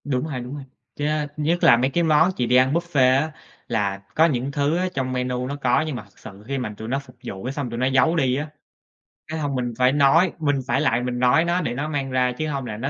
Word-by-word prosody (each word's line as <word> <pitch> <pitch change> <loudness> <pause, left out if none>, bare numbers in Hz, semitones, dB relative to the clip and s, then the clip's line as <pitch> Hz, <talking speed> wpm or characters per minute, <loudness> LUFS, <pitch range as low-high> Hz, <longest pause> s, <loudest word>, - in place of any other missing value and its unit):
Đúng 135 -1 -1
ha, 140 -5 -4
đúng 125 +3 -7
ha. 145 - -7 0.4
Yeah, 150 0 -1
nhất 160 +4 0
là 120 - +7
mấy 130 +3 +1
cái 170 +5 0
món 160 +2 +4
chỉ 125 - 0
để 125 - +3
ăn 130 +2 +4
buffet 145 -7 +3
á, 155 +1 -3 0.4
là 100 -4 -1 0.2
có 160 - +5
những 135 -4 -1
thứ 145 +3 0
á 185 - 0
trong 130 -5 -2
menu 125 0 -2
nó 140 - -4
có 130 -4 +1
nhưng 150 - -3
mà 115 - -6
thực 100 - -24
sự 100 -1 -12
khi 140 0 -2
mà 120 -5 -4
tụi 110 - -7
nó 135 +4 -1
phục 140 -3 -15
vụ 95 -1 -6
cái 130 +2 -3
xong 140 -3 -4
tụi 115 0 -5
nó 130 - +1
giấu 135 +5 +3
đi 130 -6 +2
á. 145 +3 -3 0.8
Cái 160 +1 -4
xong 145 -3 -2
mình 120 -2 -2
phải 125 0 +4
nói, 145 +5 +4
mình 145 -2 +1
phải 130 +4 +1
lại 120 -5 +1
mình 125 0 -3
nói 125 +7 +4
nó 175 +1 +1
để 120 - -2
nó 140 +5 -3
mang 140 -3 -3
ra 125 -1 +2
chứ 155 - -2
hông 140 -3 -3
là 105 -3 -5
nó 130 +5 -3
135 Hz, 280 wpm, -23 LUFS, 125-150 Hz, 0.8 s, là